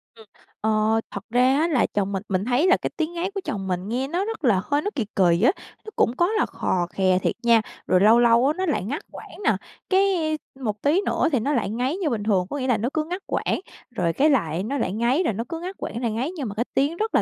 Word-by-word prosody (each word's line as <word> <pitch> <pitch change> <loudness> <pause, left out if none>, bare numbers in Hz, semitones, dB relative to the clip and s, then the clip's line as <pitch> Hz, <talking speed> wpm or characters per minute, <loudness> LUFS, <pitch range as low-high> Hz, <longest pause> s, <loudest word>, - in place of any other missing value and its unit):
Ừm. 220 - -15 0.4
Ờ. 220 +1 +2
Thật - - -6
ra 250 +3 +3
á 320 +3 +2
là 285 -8 +2
chồng 200 -1 -2
mình 195 0 -3
mình 190 0 0
thấy 255 +8 +2
là 375 - +5
cái - - -3
tiếng 320 +1 -1
ngáy 350 +3 -2
của 395 - -4
chồng 195 - -4
mình 185 +1 -2
nghe 255 +4 -1
nó 350 +7 -1
rất 445 -7 -5
là 205 -7 +3
hơi 290 +1 0
nó 410 - -2
kì 235 -6 -1
kì 175 -3 +3
á, 250 - +6 0.3
nó - - -6
cũng 240 - +2
có 345 - +3
là 435 - +2
khò 175 -2 -1
khè 185 0 +2
thiệt - - -1
nha, 235 -1 +5 0.3
rồi 185 - +4
lâu 220 +3 +6
lâu 240 +1 +5
á 295 - +2
nó 375 - 0
lại 300 - 0
ngắt 275 - -3
quãng - - -11
nè, - - +4 0.4
cái, 380 +1 +4 0.6
a, - - -10
một 210 -3 -3
tí 310 +7 +3
nữa 335 - +1
thì 265 - +2
nó 285 +7 -1
lại 240 - 0
ngáy 250 - -1
như 355 -6 -1
bình 220 -4 -2
thường. 195 -4 +2
Có 290 - -3
nghĩa 260 -2 -2
là 245 -4 +3
nó 230 +4 -1
cứ 315 - 0
ngắt 360 +3 -5
quãng, - - -1 0.4
rồi 170 -5 0
cái 295 - +3
lại 175 - +1
nó 275 +7 -2
lại 190 - -1
ngáy 240 - +1
rồi 230 - 0
nó 225 +4 -3
cứ 330 -1 -4
ngắt 370 +3 -6
quãng 230 - -5
lại 235 -3 0
ngáy, 250 +9 -2
nhưng 285 -7 -4
mà 200 - -7
cái 235 +3 -1
tiếng 285 +5 +1
rất 440 +3 -1
là - - +5
245 Hz, 280 wpm, -24 LUFS, 210-315 Hz, 0.6 s, á